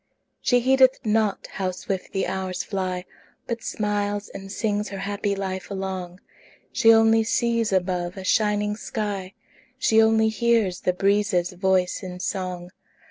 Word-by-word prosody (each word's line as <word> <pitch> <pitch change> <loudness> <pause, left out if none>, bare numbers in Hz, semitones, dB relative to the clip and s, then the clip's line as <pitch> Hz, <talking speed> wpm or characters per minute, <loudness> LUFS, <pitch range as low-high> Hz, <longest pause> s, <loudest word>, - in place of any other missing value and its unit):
She 245 -1 +3
heedeth 260 0 +4
not 215 -2 +1
how 190 -1 -3
swift 185 +1 -4
the 195 - -1
hours 185 0 -3
fly, 185 -2 -3 0.4
But 235 -1 -4
smiles 205 -1 -2
and 195 0 -9
sings 210 0 -1
her 195 - -6
happy 200 +1 -2
life 190 -1 -4
along; 190 -2 -5 0.5
She 225 -3 +6
only 225 0 +5
sees 230 -1 +1
above 180 -1 -1
a 190 - -6
shining 210 +1 +1
sky; 205 -4 -4 0.4
She 220 0 +4
only 220 0 +4
hears 220 -5 +1
the 180 - +1
breezes' 195 -2 +1
voice 185 0 +1
in 180 -2 -7
song. 180 -1 -4
200 Hz, 140 wpm, -24 LUFS, 185-220 Hz, 0.5 s, She